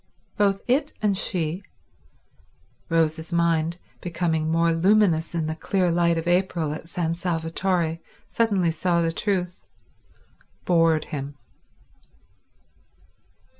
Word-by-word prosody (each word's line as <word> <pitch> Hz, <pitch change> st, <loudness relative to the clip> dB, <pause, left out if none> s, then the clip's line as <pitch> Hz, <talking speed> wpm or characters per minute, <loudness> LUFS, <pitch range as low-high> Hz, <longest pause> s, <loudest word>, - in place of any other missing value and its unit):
Both 200 Hz, -1 st, +1 dB
it 285 Hz, +4 st, +1 dB
and 205 Hz, -2 st, +2 dB
she—Rose's 165 Hz, -2 st, -4 dB
mind, 170 Hz, -1 st, +1 dB, 0.2 s
becoming 165 Hz, -2 st, -1 dB
more 165 Hz, +1 st, +2 dB
luminous 175 Hz, -2 st, +2 dB
in 165 Hz, -2 st, -1 dB
the 155 Hz, -, -2 dB
clear 180 Hz, +1 st, 0 dB
light 170 Hz, 0 st, +2 dB
of 165 Hz, +1 st, -3 dB
April 175 Hz, -4 st, +1 dB
at 160 Hz, +1 st, -9 dB
San 170 Hz, -3 st, -1 dB
Salvatore, 170 Hz, 0 st, -1 dB, 0.3 s
suddenly 200 Hz, -7 st, +1 dB
saw 170 Hz, +1 st, 0 dB
the 165 Hz, -, 0 dB
truth—bored 175 Hz, -3 st, -2 dB
him. 140 Hz, 0 st, -6 dB
170 Hz, 95 wpm, -24 LUFS, 160-185 Hz, 0.3 s, and